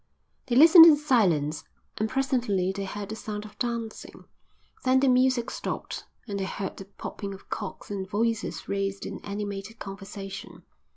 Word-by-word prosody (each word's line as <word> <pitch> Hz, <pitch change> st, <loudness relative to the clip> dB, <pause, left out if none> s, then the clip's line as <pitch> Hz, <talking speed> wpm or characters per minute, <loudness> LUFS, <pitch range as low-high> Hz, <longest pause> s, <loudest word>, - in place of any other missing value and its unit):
They 240 Hz, -, 0 dB
listened 325 Hz, +4 st, +10 dB
in 315 Hz, -, +8 dB
silence, 175 Hz, -, +2 dB, 0.4 s
and 215 Hz, +1 st, 0 dB
presently 245 Hz, -8 st, 0 dB
they 195 Hz, 0 st, -4 dB
heard 200 Hz, +1 st, -6 dB
the 220 Hz, -, -4 dB
sound 210 Hz, -1 st, -6 dB
of 210 Hz, 0 st, -14 dB
dancing. 235 Hz, -2 st, -4 dB, 0.6 s
Then 260 Hz, 0 st, +4 dB
the 275 Hz, -, +3 dB
music 255 Hz, -1 st, +3 dB
stopped, -, -, -5 dB, 0.2 s
and 200 Hz, -2 st, -3 dB
they 190 Hz, -, -1 dB
heard 190 Hz, 0 st, -5 dB
the 195 Hz, -, -8 dB
popping 200 Hz, 0 st, -7 dB
of 190 Hz, -, -18 dB
corks 205 Hz, -1 st, -6 dB
and 190 Hz, -2 st, -4 dB
voices 225 Hz, +1 st, -1 dB
raised 195 Hz, 0 st, -2 dB
in -, -, -7 dB
animated 205 Hz, +1 st, -5 dB
conversation. 195 Hz, -1 st, -8 dB
210 Hz, 160 wpm, -27 LUFS, 195-245 Hz, 0.6 s, listened